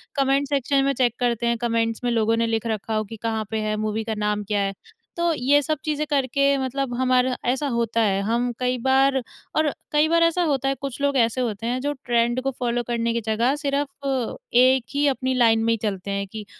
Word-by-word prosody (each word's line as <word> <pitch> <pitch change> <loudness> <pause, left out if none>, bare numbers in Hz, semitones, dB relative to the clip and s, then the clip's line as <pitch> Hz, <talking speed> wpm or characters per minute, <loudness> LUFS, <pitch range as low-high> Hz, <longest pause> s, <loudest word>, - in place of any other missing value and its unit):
Comment 275 0 +2
section 275 0 +1
में 275 0 +1
check 245 -2 +1
करते 240 -1 0
हैं, 235 0 +1
कमेंट्स 230 0 -1
में 240 - +1
लोगों 225 -1 +2
ने 230 - +1
लिख 225 0 -1
रखा 220 0 -3
हो 215 - +1
कि 225 +2 -9
कहाँ 220 -1 -1
पे 220 - -1
है, 215 0 -1
मूवी 215 +1 -2
का 220 - -3
नाम 210 0 -1
क्या 205 0 -1
है? 195 0 -1 0.4
तो 340 0 +2
ये 290 +2 +3
सब 310 +1 -1
चीज़ें 305 0 -1
करके 280 0 +2
मतलब 265 -1 -2
हमारा 255 0 +2
ऐसा 265 +4 0
होता 230 -2 0
है, 200 -2 +2
हम 240 +3 0
कई 250 0 0
बार 265 0 +3 0.3
और 310 -1 +3 0.2
कई 300 +1 +3
बार 335 0 +4
ऐसा 335 +1 +2
होता 275 -4 0
है 275 - 0
कुछ 275 -1 -5
लोग 280 -1 +1
ऐसे 235 +1 +2
होते 225 -2 -3
हैं 250 +1 -1
जो 290 - -1
ट्रेंड 240 +1 +1
को 270 +1 -1
फॉलो 240 -1 0
करने 235 -1 0
की 235 - -1
जगह, 230 +5 +1
सिर्फ 280 -1 -3 0.5
एक 255 +1 +5
ही 290 +1 +1
अपनी 260 -1 0
लाइन 225 -3 +3
में 230 0 +2
ही - - -1
चलते 200 -1 -3
हैं 200 0 -2
कि 210 +1 -8
245 Hz, 230 wpm, -23 LUFS, 225-275 Hz, 0.5 s, एक